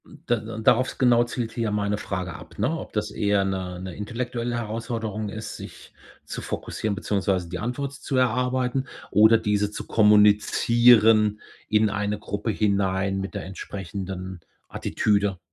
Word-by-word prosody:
M - - -16
da 120 - +2
da 110 +1 -7
darauf 120 +3 +2
genau 120 -2 +4
zielt 120 -1 -4
hier 115 -2 -2
meine 105 0 0
Frage 90 -3 -4
ab, 85 - -12
ne? 125 +11 0
Ob - - -9
das 105 -1 -2
eher 100 -1 +1
'ne 95 -2 -3
'ne 90 -2 -7
intellektuelle 120 +2 -3
Herausforderung 110 -2 -4
ist, 110 +1 -6
sich - - -11 0.3
zu - - -6
fokussieren 110 -2 -3
beziehungsweise 100 -4 -1
die 90 0 -5
Antwort 130 +6 -3
zu 140 -1 -5
erarbeiten 125 +1 +1 0.3
oder 110 +3 +6
diese 105 -1 0
zu - - -6
kommunizieren 105 +1 +5 0.3
in 110 0 +3
eine 105 0 -1
Gruppe 105 +2 -4
hinein 95 -2 0
mit 95 -2 -5
der - - -4
entsprechenden 95 -1 -6 0.3
Attitüde 100 -3 0
105 Hz, 150 wpm, -25 LUFS, 100-115 Hz, 0.3 s, oder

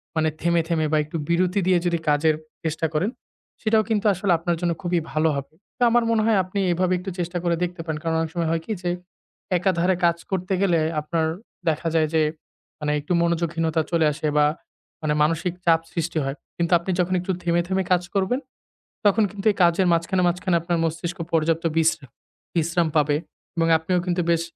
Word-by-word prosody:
মানে 160 0 +2
থেমে, 170 0 +3
থেমে 165 -2 +1
বা 155 - +3
একটু 155 +2 -5
বিরতি 180 +3 +2
দিয়ে 185 -1 +4
যদি 170 -1 +2
কাজের 150 +1 +3 0.3
চেষ্টা 160 0 -1
করেন 175 +7 +1 0.5
সেটাও 220 0 +3
কিন্তু 215 -1 0
আসলে 190 +1 -1
আপনার 170 +1 -1
জন্য 175 -1 +1
খুবই 175 -2 +1
ভালো 155 +1 +2
হবে। 140 +2 -6 0.2
তো - - -23
আমার 240 +1 +3
মনে 225 -1 +3
হয় 220 -2 +3
আপনি 185 +2 -4
এভাবে 185 +1 +1
একটু 185 +2 -6
চেষ্টা 175 +1 -2
করে 170 -1 +2
দেখতে 175 -1 -3
পারেন। 160 -2 -3
কারণ 165 -1 0
অনেক 160 -1 -2
সময় 170 -2 0
হয় 165 0 0
কি - - -5
যে 175 - -1 0.7
একাধারে 180 0 +2
কাজ 170 0 +3
করতে 185 0 -1
গেলে 175 -4 +3 0.2
আপনার 160 +1 -1 0.4
দেখা 160 +1 -1
যায় 160 -1 +3
যে 160 - +4 0.6
মানে 150 -1 -1
একটু 150 +5 -2
মনোযোগহীনতা 165 -1 0
চলে 165 -2 +3
আসে 155 +1 -3
বা 150 - +5 0.6
মানে 155 -1 0
মানসিক 165 +3 0
চাপ 165 -1 +5
সৃষ্টি 170 -1 -2
হয়। 135 0 -3 0.2
কিন্তু 170 0 -1
আপনি 175 +3 -3
যখন 180 +1 +1
একটু 180 +2 -2
থেমে, 175 0 +2
থেমে 190 +1 0
কাজ 180 -1 +4
করবেন 200 +6 +1 0.7
তখন 205 +2 +5
কিন্তু 205 0 -8
এই 200 - -8
কাজের 175 +2 +3
মাঝখানে, 170 +3 +1
মাঝখানে 180 +1 0
আপনার 170 +1 -1
মস্তিষ্ক 170 +3 -3 0.2
পর্যাপ্ত 165 0 +2
বিশ্রা 160 -2 +2 0.5
বিশ্রাম 170 +1 +1
পাবে। 150 -1 +3 0.4
এবং 165 0 +2
আপনিও 180 +3 0
কিন্তু 175 0 +1
বেশ 165 -1 +2
170 Hz, 195 wpm, -23 LUFS, 160-180 Hz, 0.7 s, বা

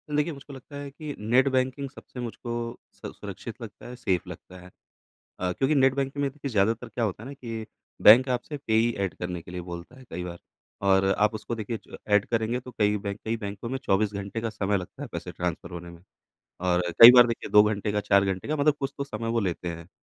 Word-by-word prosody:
देखिए, 150 +2 +1
मुझको 140 +1 -11
लगता 135 +2 -11
है 145 0 -6
कि 150 +1 -7
नेट 125 +6 +3
बैंकिंग 130 +1 0
सबसे 125 - -12
मुझको 120 0 -5 0.4
स - - -8
सुरक्षित - - -8
लगता - - -10
है, 125 - -8
सेफ़ 95 -7 0
लगता 90 0 -10
है। 90 - -13 0.7
अ, 90 0 0
क्योंकि 135 - +1
नेट 135 -1 +5
बैंकिंग 140 +1 -2
में 140 - +1
देखिए 140 0 -6
ज़्यादातर 110 +2 +1
क्या 120 - -2
होता 105 0 -2
है - - -8
ना 140 - -6
कि 115 -4 -6 0.4
बैंक 125 +5 +8
आपसे 125 +4 -2
पेयी 115 -3 +2
ऐड 95 - -2
करने 90 -1 -4
के 85 - -12
लिए 90 0 -4
बोलता 85 +6 -8
है - - -13
कई 90 +2 -5
बार 85 -1 -7 0.5
और 95 0 +4
आप 105 +1 +3
उसको 115 +2 -4
देखिए 110 0 -4 0.3
ऐड 105 0 +5
करेंगे 115 +1 0
तो 125 0 -11
कई 105 0 +3
बैंक 100 0 -5
कई 115 +1 -1
बैंकों 105 +2 -6
में 135 - -2
24 105 +2 +2
घंटे 100 +3 -4
का 115 - -1
समय 105 -1 0
लगता 90 -2 -8
है - - -4
पैसे - - -5
ट्रांसफ़र 85 0 -4
होने 85 0 -7
में 85 0 -13 0.7
और 90 0 +3 0.2
कई 115 +1 +14
बार 125 -1 +8
देखिए 115 -1 -4
2 105 0 +8
घंटे 105 -1 0
का, 105 - +1
4 100 -1 +4
घंटे 95 +4 -2
का 155 - 0
मतलब 145 0 +3
कुछ 135 - -2
तो 140 - -1
समय 115 -4 -5
वो 115 0 +1
लेते 90 -3 -2
हैं 85 0 -7
110 Hz, 235 wpm, -27 LUFS, 95-130 Hz, 0.7 s, कई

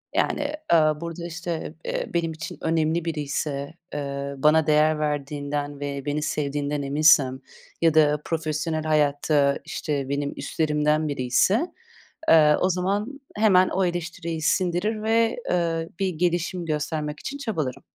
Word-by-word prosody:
Yani, 290 0 0 0.2
ııı, 155 -1 +4
burada, 170 0 -5
işte, 170 -1 -5
eee, - - -3
benim 170 -1 0
için 160 0 -7
önemli 160 +1 +1
biriyse, 145 -2 -3 0.2
eee, 140 -1 -4
bana 155 +3 +4
değer 155 0 +3
verdiğinden 145 -1 -3
ve 140 -1 -4
beni 145 +1 -1
sevdiğinden 145 -1 -2
eminsem 140 -2 +4 0.4
ya 165 -2 +4
da 150 -1 +4
profesyonel 155 -1 -2
hayatta, 145 -2 +2
işte, 140 -3 -3
benim 140 0 -2
üstlerimden 150 0 0
biriyse, 145 - +2 0.6
eee, 150 -2 +6
o 185 - +2
zaman 200 +9 -1 0.2
hemen 190 -4 +5
o 190 +1 0
eleştiriyi 175 -2 -3
sindirir 185 +6 0
ve, 225 +1 +2
eee, 165 -2 0
bir 195 - +1
gelişim 175 +1 -1
göstermek 150 -1 -2
için 280 - -5
çabalarım. 155 - -3
155 Hz, 130 wpm, -24 LUFS, 145-170 Hz, 0.6 s, eee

